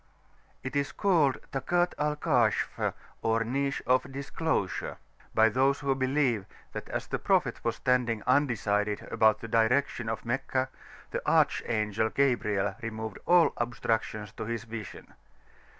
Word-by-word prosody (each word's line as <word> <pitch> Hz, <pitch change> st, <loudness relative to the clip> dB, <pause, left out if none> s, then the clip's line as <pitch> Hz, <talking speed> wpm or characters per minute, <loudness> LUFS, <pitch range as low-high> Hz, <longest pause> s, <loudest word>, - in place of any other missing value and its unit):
[p.410]It 130 Hz, -, -5 dB
is 140 Hz, 0 st, 0 dB
called 165 Hz, -9 st, +3 dB
"Takat 175 Hz, +6 st, +1 dB
al 150 Hz, 0 st, +1 dB
Kashf" 150 Hz, -, +1 dB, 0.3 s
or 115 Hz, +1 st, +1 dB
"Niche 140 Hz, +4 st, -1 dB
of 130 Hz, +1 st, +2 dB
Disclosure," 140 Hz, -, -2 dB, 0.4 s
by 110 Hz, 0 st, +6 dB
those 135 Hz, +5 st, +2 dB
who 140 Hz, -1 st, +1 dB
believe 130 Hz, -5 st, +1 dB, 0.3 s
that -, -, -6 dB
as -, -, -3 dB
the -, -, -3 dB
Prophet -, -, +1 dB
was -, -, 0 dB
standing 125 Hz, -4 st, +1 dB
undecided 105 Hz, -6 st, +1 dB
about 110 Hz, -1 st, +3 dB
the 115 Hz, -, -6 dB
direction 120 Hz, +1 st, +1 dB
of 110 Hz, -, -4 dB
Meccah, 130 Hz, +1 st, -1 dB, 0.4 s
the -, -, -2 dB
Archangel 110 Hz, -1 st, +2 dB
Gabriel 105 Hz, -8 st, +1 dB
removed 110 Hz, -2 st, -5 dB
all 175 Hz, -1 st, +5 dB
obstructions 110 Hz, -3 st, -2 dB
to 110 Hz, -, -6 dB
his 115 Hz, 0 st, -3 dB
vision. 115 Hz, -2 st, -8 dB
120 Hz, 135 wpm, -29 LUFS, 110-140 Hz, 0.4 s, by